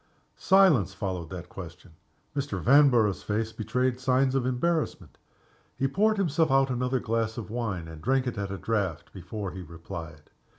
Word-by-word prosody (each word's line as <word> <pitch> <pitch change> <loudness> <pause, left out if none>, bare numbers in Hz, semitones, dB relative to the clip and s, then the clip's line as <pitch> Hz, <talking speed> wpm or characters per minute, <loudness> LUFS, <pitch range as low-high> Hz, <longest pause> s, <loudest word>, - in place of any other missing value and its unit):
Silence 165 - +4
followed 90 -5 -4
that 90 -1 -7
question. 90 0 -10 0.4
Mr. 140 -9 -2
Vanborough's 120 - +4
face 110 +2 -2
betrayed 125 +3 -1
signs 130 0 +2
of 130 -2 +1
embarrassment. 155 +6 -1 0.6
He 135 - +1
poured 215 +9 +2
himself 165 -4 +2
out 135 0 +3
another 125 +1 0
glass 115 -1 -1
of 110 -2 -6
wine, 105 -8 -3
and 80 -1 -10
drank 130 +4 +1
it 125 - -3
at 100 -1 -3
a 100 - -4
draught 100 -9 -2
before 95 +1 -6
he 95 +1 -7
replied. 85 -3 -9
115 Hz, 160 wpm, -27 LUFS, 95-135 Hz, 0.6 s, Silence